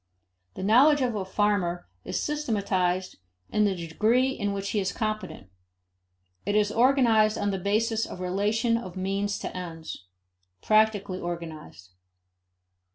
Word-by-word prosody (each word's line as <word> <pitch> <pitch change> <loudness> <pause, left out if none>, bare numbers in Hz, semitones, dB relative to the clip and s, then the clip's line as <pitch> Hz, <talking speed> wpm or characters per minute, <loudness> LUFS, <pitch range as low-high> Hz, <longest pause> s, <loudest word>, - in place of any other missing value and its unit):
The - - -5
knowledge 270 +8 +5
of 250 -2 +1
a 205 -3 -2
farmer 190 -3 0 0.2
is - - -3
systematized 195 -10 -1 0.3
in 210 0 +3
the 195 -2 +1
degree 215 +10 +1
in 205 -6 -2
which 200 0 -3
he 210 - +1
is 190 -1 -1
competent. 215 - -4 0.9
It 205 +2 -1
is 210 0 +3
organized 230 -3 +4
on 205 0 0
the 195 - -2
basis 220 +4 0
of - - -8
relation 210 +6 +1
of 190 -6 -7
means 195 +2 -1
to - - -6
ends 165 - -7 0.5
practically 210 - +2
organized. 160 - -7
205 Hz, 135 wpm, -27 LUFS, 185-220 Hz, 0.9 s, knowledge